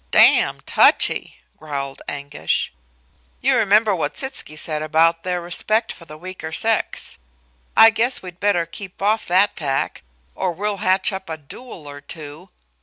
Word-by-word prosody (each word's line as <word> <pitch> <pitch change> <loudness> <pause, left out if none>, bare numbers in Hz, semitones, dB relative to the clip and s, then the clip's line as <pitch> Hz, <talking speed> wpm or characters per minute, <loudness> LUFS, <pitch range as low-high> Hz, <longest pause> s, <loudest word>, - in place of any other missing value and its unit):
"Damned - - +5
touchy!" - - +3 0.2
growled 140 -3 -5
Anguish. 140 - -2 0.7
"You 265 +1 +2
remember 215 -2 +3
what 150 -4 -2
Sitzky 265 - -3
said 155 -1 -1
about 165 +2 +2
their 180 0 -2
respect 215 +6 +1
for 170 - -14
the 155 -1 -11
weaker 180 -1 -7
sex. 220 +6 -1 0.6
I 225 0 +9
guess 235 +3 +2
we'd 180 -1 -10
better 200 -4 +1
keep 185 +2 -9
off 215 +2 +1
that 190 +4 +3
tack 135 -4 -2 0.3
or 185 -2 -2
we'll 205 +3 -3
hatch 185 +1 +2
up 190 -2 -6
a 160 - -4
duel 155 - -11
or 145 0 -9
two. 155 +4 -10
180 Hz, 150 wpm, -21 LUFS, 155-205 Hz, 0.7 s, I